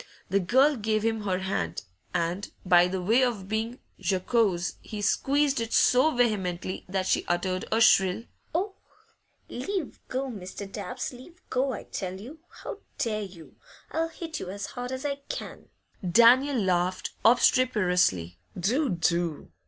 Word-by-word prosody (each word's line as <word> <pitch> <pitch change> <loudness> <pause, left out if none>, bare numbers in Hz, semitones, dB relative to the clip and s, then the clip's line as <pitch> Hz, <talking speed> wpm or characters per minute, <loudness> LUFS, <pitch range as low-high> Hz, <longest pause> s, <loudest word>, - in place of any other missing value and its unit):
The 200 - +4
girl 265 +10 +4
gave 215 -1 0
him 225 -2 -1
her 185 -2 +1
hand, 185 - -2 0.3
and, 175 +3 -1 0.2
by 175 -1 +6
way 190 +7 +2
of 230 -7 0
being 220 +3 -2 0.2
jocose, 190 0 +1
he 215 - -7
squeezed 275 +5 +2
it 230 0 -3
so 255 +5 +5
vehemently 195 - -1
that 190 0 -1
she - - +2
uttered 185 +1 -1
a 220 - +3
shrill 195 -2 +4 0.3
'Oh!' 385 +3 0 0.7
'Leave 345 +5 -4
go, 265 +1 -2
Mr. 200 -4 -7
Dabbs! 250 +6 -5
Leave 300 +9 -13
go, 260 +1 +1
I - - -6
tell 185 -1 -5
you! 270 +10 -10 0.2
How 410 - -6 0.2
dare 215 -2 -1
you? 180 -5 -10 0.3
I'll 325 +1 0
hit 325 -2 -6
you 180 - -6
as 200 +1 -5
hard 245 0 -5
as 260 +2 -5
I 280 -1 -1
can!' - - -6 0.3
Daniel 240 +9 +5
laughed 185 -2 0
obstreperously. 180 - +3 0.2
'Do! 250 - +1
do! 170 -3 -1
215 Hz, 145 wpm, -27 LUFS, 185-255 Hz, 0.7 s, by